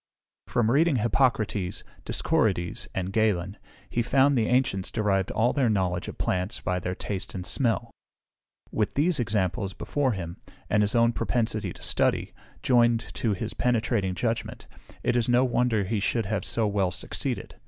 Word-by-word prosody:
From 115 Hz, -1 st, +1 dB
reading 155 Hz, +3 st, +4 dB
Hippocrates, 110 Hz, -5 st, +1 dB, 0.2 s
Discorides, 110 Hz, -, 0 dB
and 95 Hz, 0 st, -2 dB
Galen, 100 Hz, -3 st, +1 dB, 0.3 s
he 120 Hz, -, -1 dB
found 135 Hz, +4 st, +3 dB
the 115 Hz, -3 st, +2 dB
ancients 125 Hz, -7 st, +1 dB
derived 100 Hz, -4 st, 0 dB
all 115 Hz, +3 st, +1 dB
their 135 Hz, -5 st, +2 dB
knowledge 90 Hz, -4 st, 0 dB
of -, -, -7 dB
plants 90 Hz, +4 st, -1 dB
by 90 Hz, 0 st, -1 dB
their 90 Hz, +1 st, -3 dB
taste 100 Hz, 0 st, -4 dB
and 90 Hz, -1 st, -5 dB
smell. 115 Hz, -1 st, 0 dB, 0.8 s
With 105 Hz, -2 st, -1 dB
these 155 Hz, +2 st, +2 dB
examples 100 Hz, -4 st, -1 dB
before 140 Hz, -4 st, -1 dB
him, 85 Hz, -3 st, -6 dB, 0.3 s
and 105 Hz, -, +4 dB
his 105 Hz, +3 st, +1 dB
own 115 Hz, 0 st, +4 dB
propensity 115 Hz, 0 st, -1 dB
to -, -, -12 dB
study, -, -, +1 dB, 0.3 s
joined 120 Hz, -2 st, +3 dB
to 110 Hz, -3 st, 0 dB
his 105 Hz, +3 st, -4 dB
penetrating 110 Hz, -6 st, 0 dB
judgement, 115 Hz, +4 st, -3 dB, 0.4 s
it -, -, +1 dB
is 120 Hz, -1 st, +1 dB
no 120 Hz, +2 st, +4 dB
wonder 120 Hz, -4 st, +1 dB
he 105 Hz, +3 st, -1 dB
should 115 Hz, +3 st, 0 dB
have 100 Hz, 0 st, -2 dB
so 115 Hz, -, +1 dB
well 100 Hz, -3 st, +1 dB
succeeded. -, -, -4 dB
110 Hz, 160 wpm, -26 LUFS, 95-120 Hz, 0.8 s, reading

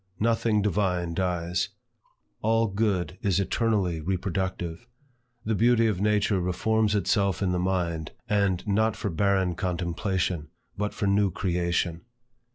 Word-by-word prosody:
Nothing 115 Hz, -2 st, +2 dB
divine 90 Hz, -4 st, 0 dB
dies. 90 Hz, -1 st, -1 dB, 0.7 s
All 115 Hz, +1 st, +3 dB
good 100 Hz, -3 st, -1 dB
is 100 Hz, -2 st, +1 dB
eternally 100 Hz, -5 st, 0 dB
reproductive. 90 Hz, +2 st, -3 dB, 0.6 s
The 110 Hz, -, +1 dB
beauty 115 Hz, +2 st, +4 dB
of 105 Hz, -4 st, 0 dB
nature 105 Hz, -1 st, +2 dB
reforms 105 Hz, +4 st, +1 dB
itself 100 Hz, 0 st, +1 dB
in 95 Hz, -, +1 dB
the 90 Hz, -, 0 dB
mind, 85 Hz, -4 st, -1 dB, 0.2 s
and 100 Hz, -2 st, +1 dB
not 110 Hz, +2 st, +2 dB
for 100 Hz, -, -3 dB
barren 95 Hz, +1 st, +2 dB
contemplation, 90 Hz, -1 st, -2 dB, 0.3 s
but 105 Hz, +1 st, -3 dB
for -, -, -1 dB
new 100 Hz, 0 st, +3 dB
creation. 85 Hz, -2 st, -1 dB
95 Hz, 125 wpm, -27 LUFS, 90-105 Hz, 0.7 s, beauty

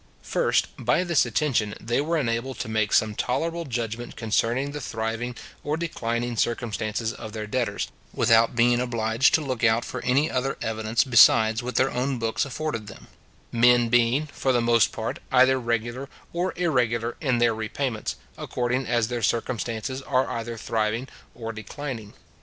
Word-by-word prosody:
First, -, -, +1 dB
by 125 Hz, +8 st, +2 dB
this 170 Hz, -8 st, +2 dB
attention 120 Hz, -4 st, 0 dB
they 120 Hz, +4 st, 0 dB
were 165 Hz, +3 st, 0 dB
enabled 120 Hz, -2 st, -1 dB
to -, -, -4 dB
make 110 Hz, -1 st, 0 dB
some 110 Hz, -1 st, +3 dB
tolerable 165 Hz, +10 st, -2 dB
judgment 120 Hz, -2 st, -4 dB
concerning 120 Hz, +5 st, 0 dB
the 150 Hz, 0 st, -6 dB
thriving 115 Hz, +1 st, -3 dB, 0.3 s
or 150 Hz, +2 st, -1 dB
declining 120 Hz, -7 st, -2 dB
circumstances 110 Hz, -1 st, -1 dB
of 110 Hz, -2 st, -9 dB
their 110 Hz, -1 st, -4 dB
debtors, 120 Hz, +3 st, -1 dB, 0.2 s
without 115 Hz, +1 st, +3 dB
being 120 Hz, +1 st, +4 dB
obliged 115 Hz, 0 st, +2 dB
to 160 Hz, -, +1 dB
look 130 Hz, -4 st, -3 dB
out 115 Hz, 0 st, +3 dB
for -, -, -6 dB
any 135 Hz, +5 st, +3 dB
other 135 Hz, +1 st, -1 dB
evidence 110 Hz, +1 st, 0 dB
besides 115 Hz, -2 st, +5 dB
what 125 Hz, 0 st, -5 dB
their 130 Hz, +1 st, +3 dB
own 130 Hz, +1 st, -1 dB
books 115 Hz, +2 st, -1 dB
afforded 135 Hz, -5 st, -4 dB
them; 100 Hz, -, -12 dB, 0.4 s
men 120 Hz, 0 st, +4 dB
being, 120 Hz, +5 st, +3 dB
for 135 Hz, -2 st, -1 dB
the 125 Hz, -, +3 dB
most 115 Hz, -1 st, +3 dB
part, 110 Hz, 0 st, -4 dB
either 130 Hz, 0 st, +5 dB
regular 120 Hz, +3 st, -2 dB, 0.2 s
or 180 Hz, +2 st, 0 dB
irregular 120 Hz, -9 st, 0 dB
in 130 Hz, -5 st, +1 dB
their 120 Hz, -1 st, +3 dB
repayments, 110 Hz, +1 st, -3 dB, 0.2 s
according 125 Hz, +1 st, -1 dB
as 120 Hz, -2 st, +1 dB
their 120 Hz, 0 st, -3 dB
circumstances 115 Hz, +3 st, -2 dB
are 130 Hz, -1 st, +1 dB
either 115 Hz, 0 st, -4 dB
thriving 110 Hz, +3 st, -1 dB, 0.3 s
or 115 Hz, -1 st, -5 dB
declining. 110 Hz, 0 st, -7 dB
120 Hz, 160 wpm, -25 LUFS, 115-130 Hz, 0.4 s, besides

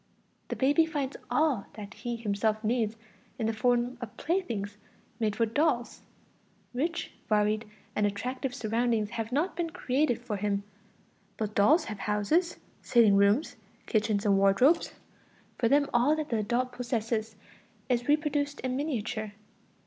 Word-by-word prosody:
The -, -, -3 dB
baby 290 Hz, +5 st, +3 dB
finds 285 Hz, -4 st, -3 dB
all 295 Hz, -10 st, +1 dB
that 205 Hz, -2 st, -9 dB
he 240 Hz, -1 st, -4 dB
himself 215 Hz, 0 st, -1 dB
needs 225 Hz, -1 st, 0 dB, 0.4 s
in 225 Hz, -, -2 dB
the 225 Hz, -, +1 dB
form 245 Hz, +2 st, +1 dB
of 230 Hz, -4 st, -8 dB
playthings 230 Hz, -, -2 dB, 0.4 s
made 215 Hz, -3 st, 0 dB
for 230 Hz, -, +2 dB
dolls; 245 Hz, +1 st, 0 dB, 0.7 s
rich, 320 Hz, +7 st, -2 dB, 0.2 s
varied 215 Hz, +1 st, +2 dB, 0.3 s
and 210 Hz, -1 st, +2 dB
attractive 250 Hz, +5 st, -3 dB
surroundings 225 Hz, -1 st, 0 dB
have 225 Hz, +2 st, -4 dB
not 310 Hz, +9 st, 0 dB
been 335 Hz, -1 st, -1 dB
created 275 Hz, -6 st, 0 dB
for 235 Hz, -4 st, -4 dB
him, 200 Hz, 0 st, -1 dB, 0.7 s
but 215 Hz, -1 st, -3 dB
dolls 295 Hz, -, +5 dB
have 210 Hz, -3 st, -6 dB
houses, 210 Hz, -, +1 dB, 0.2 s
sitting 225 Hz, -5 st, +5 dB
rooms, 215 Hz, +6 st, +3 dB, 0.3 s
kitchens 215 Hz, -1 st, +1 dB
and 200 Hz, -1 st, +4 dB
wardrobes; 225 Hz, -, +4 dB, 0.7 s
for 230 Hz, -, +3 dB
them 285 Hz, +1 st, +4 dB
all 250 Hz, +6 st, +4 dB
that 310 Hz, -1 st, -4 dB
the 230 Hz, -, +1 dB
adult 240 Hz, +4 st, 0 dB
possesses 230 Hz, -3 st, -2 dB, 0.5 s
is 245 Hz, -1 st, 0 dB
reproduced 290 Hz, -1 st, +1 dB
in 255 Hz, -1 st, -2 dB
miniature. 235 Hz, -7 st, -3 dB
235 Hz, 140 wpm, -29 LUFS, 215-280 Hz, 0.7 s, dolls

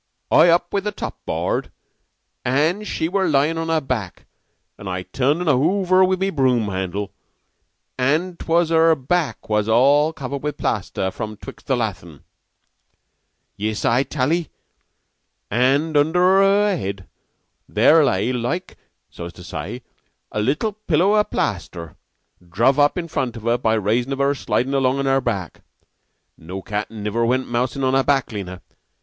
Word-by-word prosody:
I 175 Hz, -, +6 dB
up 175 Hz, +1 st, +2 dB
with 200 Hz, 0 st, -1 dB
the 210 Hz, -, 0 dB
top -, -, -7 dB
board, -, -, -2 dB, 0.7 s
an' 155 Hz, +11 st, +1 dB
she 160 Hz, -, -2 dB
were 190 Hz, +1 st, 0 dB
lying 155 Hz, +2 st, +2 dB
on 165 Hz, 0 st, -3 dB
her 165 Hz, -1 st, +2 dB
back, 125 Hz, -, -4 dB, 0.5 s
an' 100 Hz, -, -8 dB
I 90 Hz, 0 st, -3 dB
turned 140 Hz, -, 0 dB
un 180 Hz, -, -3 dB
ovver 185 Hz, +7 st, +3 dB
with 185 Hz, 0 st, +1 dB
the 195 Hz, 0 st, +1 dB
brume 125 Hz, -, +1 dB
handle, 95 Hz, +2 st, -3 dB, 0.9 s
an' 155 Hz, +8 st, +1 dB
'twas 170 Hz, 0 st, +1 dB
her 165 Hz, 0 st, +4 dB
back 140 Hz, -1 st, -2 dB
was 105 Hz, 0 st, 0 dB
all 140 Hz, +7 st, +4 dB
covered 140 Hz, -2 st, -6 dB
with 150 Hz, 0 st, -3 dB
the -, -, -14 dB
plaster 95 Hz, -3 st, -1 dB
from 110 Hz, +2 st, -6 dB
'twixt 135 Hz, -, -12 dB
the 135 Hz, -, +2 dB
lathin'. 95 Hz, -, -5 dB, 1.3 s
Yiss, 105 Hz, +1 st, -3 dB
I 120 Hz, +3 st, +3 dB
tal 140 Hz, +1 st, -1 dB
'ee. 170 Hz, -2 st, -1 dB, 1.0 s
An' 140 Hz, +6 st, +2 dB
under 155 Hz, +4 st, +3 dB, 0.2 s
her 200 Hz, +1 st, +3 dB
head 100 Hz, -, -5 dB, 0.6 s
there 160 Hz, 0 st, +5 dB
lay, 110 Hz, 0 st, +1 dB
like, 125 Hz, +10 st, -3 dB, 0.3 s
so's 85 Hz, +1 st, -8 dB
to 90 Hz, -, -13 dB
say, 90 Hz, +9 st, -6 dB, 0.5 s
a 105 Hz, -, -1 dB
little 150 Hz, -, 0 dB
pillow 195 Hz, -1 st, +1 dB
o' 210 Hz, -, +4 dB
plaster 85 Hz, -, -4 dB, 0.5 s
druv 120 Hz, +10 st, +2 dB
up 145 Hz, +3 st, +3 dB
in 170 Hz, -2 st, -3 dB
front 125 Hz, -7 st, -3 dB
of 110 Hz, -, -10 dB
her 120 Hz, +1 st, +1 dB
by 110 Hz, -2 st, +1 dB
raison 115 Hz, +5 st, 0 dB
of -, -, -4 dB
her 140 Hz, +1 st, +2 dB
slidin' 135 Hz, -1 st, -1 dB
along 135 Hz, -1 st, +2 dB
on 140 Hz, -, -1 dB
her 135 Hz, 0 st, +2 dB
back. 100 Hz, -9 st, -4 dB, 0.8 s
No 95 Hz, +4 st, -7 dB
cat 105 Hz, 0 st, -3 dB
niver 110 Hz, +1 st, -2 dB
went 130 Hz, +3 st, +1 dB
mousin' 125 Hz, +3 st, -1 dB
on 130 Hz, 0 st, +2 dB
her 135 Hz, -, +4 dB
back, 135 Hz, -3 st, +1 dB
Lena. 95 Hz, -4 st, -7 dB
135 Hz, 165 wpm, -21 LUFS, 110-160 Hz, 1.3 s, I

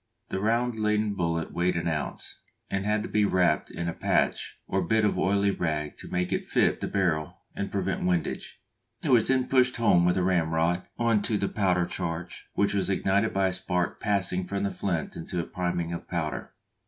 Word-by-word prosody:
The 95 Hz, -, -2 dB
round 115 Hz, +3 st, +1 dB
leaden 105 Hz, -1 st, +1 dB
bullet 85 Hz, -3 st, -1 dB
weighed 90 Hz, 0 st, +1 dB
an 85 Hz, -, -1 dB
ounce, 75 Hz, -3 st, -4 dB, 0.3 s
and 100 Hz, +1 st, -1 dB
had 105 Hz, 0 st, +1 dB
to -, -, -6 dB
be 105 Hz, -, +2 dB
wrapped 90 Hz, -3 st, +2 dB
in 85 Hz, -, -4 dB
a 85 Hz, -, -1 dB
"patch" -, -, 0 dB
or -, -, 0 dB
bit 110 Hz, -1 st, +2 dB
of 105 Hz, -, +2 dB
oily 100 Hz, +1 st, +2 dB
rag 75 Hz, -5 st, -2 dB
to -, -, -9 dB
make 90 Hz, 0 st, -1 dB
it -, -, -2 dB
fit -, -, +2 dB
the -, -, -1 dB
barrel 85 Hz, -6 st, -1 dB
and -, -, -3 dB
prevent -, -, -1 dB
windage; 90 Hz, -2 st, -1 dB, 0.4 s
it -, -, -1 dB
was 120 Hz, -4 st, +5 dB
then 130 Hz, -1 st, +2 dB
pushed 130 Hz, -1 st, +3 dB
home 100 Hz, -7 st, +4 dB
with 90 Hz, +1 st, +3 dB
a 90 Hz, -, +2 dB
ramrod 85 Hz, -1 st, +1 dB
on 115 Hz, -3 st, +2 dB
to 105 Hz, +1 st, 0 dB
the 100 Hz, -, 0 dB
powder 90 Hz, -4 st, +1 dB
charge, 85 Hz, 0 st, -5 dB
which 100 Hz, 0 st, +2 dB
was 100 Hz, -1 st, +1 dB
ignited 100 Hz, +2 st, +2 dB
by 95 Hz, -1 st, +2 dB
a -, -, -4 dB
spark 90 Hz, -1 st, -1 dB
passing 95 Hz, -3 st, 0 dB
from 100 Hz, +1 st, -2 dB
the 100 Hz, -, 0 dB
flint 90 Hz, -2 st, -2 dB
into 85 Hz, +2 st, -4 dB
a -, -, 0 dB
priming 90 Hz, -2 st, -2 dB
of 85 Hz, -, -6 dB
powder. 80 Hz, -7 st, -3 dB
95 Hz, 205 wpm, -27 LUFS, 85-105 Hz, 0.4 s, was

